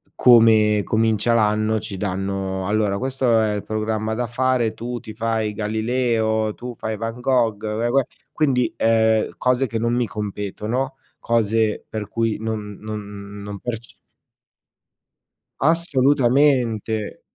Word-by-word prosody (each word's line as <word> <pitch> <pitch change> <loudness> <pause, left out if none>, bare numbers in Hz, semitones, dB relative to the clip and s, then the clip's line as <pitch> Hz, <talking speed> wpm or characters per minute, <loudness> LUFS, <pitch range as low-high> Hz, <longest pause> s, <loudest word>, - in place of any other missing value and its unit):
come 110 -3 +5
comincia 110 +1 +1
l'anno 110 0 +2
ci 100 -2 -6
danno: 95 -1 -3
"Allora 105 -1 +1
questo 130 -2 +1
è 110 -1 +1
il 105 - -2
programma 110 0 -2
da 125 - -1
fare, 125 -1 0
tu 120 +1 -5
ti 110 - -10
fai 110 -1 -1
Galileo, 110 0 0
tu 125 0 -7
fai 110 -1 -4
Van 115 +2 -5
Gogh, 120 -5 +1
uè, 110 +2 -1
uè". 135 +3 +3 0.3
Quindi, 135 -6 +1
ehm, 110 -1 +3
cose 125 +1 +1
che 115 - -3
non 115 +1 0
mi 120 -1 +1
competono, 105 +6 -3 0.2
cose 110 -1 +1
per 110 -2 -5
cui 115 -2 -1
non 105 -2 -4
non 100 -1 -7
non 100 -1 -7
perce 115 -1 -6 1.6
Assolutamente. 130 - +2
110 Hz, 130 wpm, -22 LUFS, 105-120 Hz, 1.6 s, come